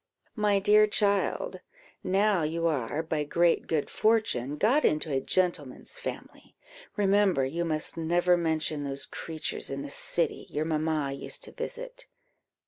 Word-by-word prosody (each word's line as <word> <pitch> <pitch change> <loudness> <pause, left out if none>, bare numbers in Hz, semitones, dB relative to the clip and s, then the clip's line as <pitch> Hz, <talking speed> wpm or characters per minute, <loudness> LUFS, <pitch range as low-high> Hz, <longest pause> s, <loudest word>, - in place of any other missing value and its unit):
"My 210 -3 +2
dear 210 +2 +5
child, 200 -1 +1 0.4
now 195 0 +2
you 165 +2 -1
are, 150 -1 0
by 155 -2 -1
great 170 +3 +2
good 155 -3 0
fortune, 215 - +1
got 245 - +3
into 155 0 +1
a 135 - +1
gentleman's 170 -6 -1
family, - - -8 0.4
remember 200 -7 +3
you 165 +6 -2
must 155 -1 -3
never 175 +2 +3
mention 160 -3 0
those 140 0 -2
creatures 160 -2 -4
in 140 0 -4
the 145 - -6
city 170 +3 0
your 150 +1 -2
mamma 155 -2 0
used 135 - -6
to - - -7
visit. - - -7
165 Hz, 140 wpm, -28 LUFS, 150-200 Hz, 0.4 s, dear